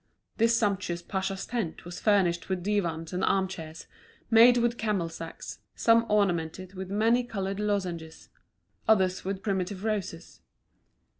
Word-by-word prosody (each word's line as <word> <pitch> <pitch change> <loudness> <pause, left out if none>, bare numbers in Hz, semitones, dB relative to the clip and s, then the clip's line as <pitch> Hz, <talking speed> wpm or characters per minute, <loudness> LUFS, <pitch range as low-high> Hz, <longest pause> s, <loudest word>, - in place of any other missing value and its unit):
This 230 0 +4
sumptuous 195 -5 -1
pacha's 190 0 -3
tent 225 -11 -4
was 175 0 -7
furnished 190 -5 +2
with 185 -2 -2
divans 175 -5 -1
and 180 - -1
arm 190 -1 +2
chairs, 165 -3 -8 0.5
made 235 +2 +8
with 240 0 +1
camel 205 -7 0
sacks, 165 0 -8 0.2
some 230 0 +4
ornamented 185 -3 0
with 190 -1 -6
many 225 +5 +2
coloured 195 -4 -4
lozenges, 180 -6 -3 0.6
others 190 -4 +3
with 195 0 -4
primitive 190 -1 -2
roses. 200 -6 -4
195 Hz, 135 wpm, -28 LUFS, 175-215 Hz, 0.6 s, made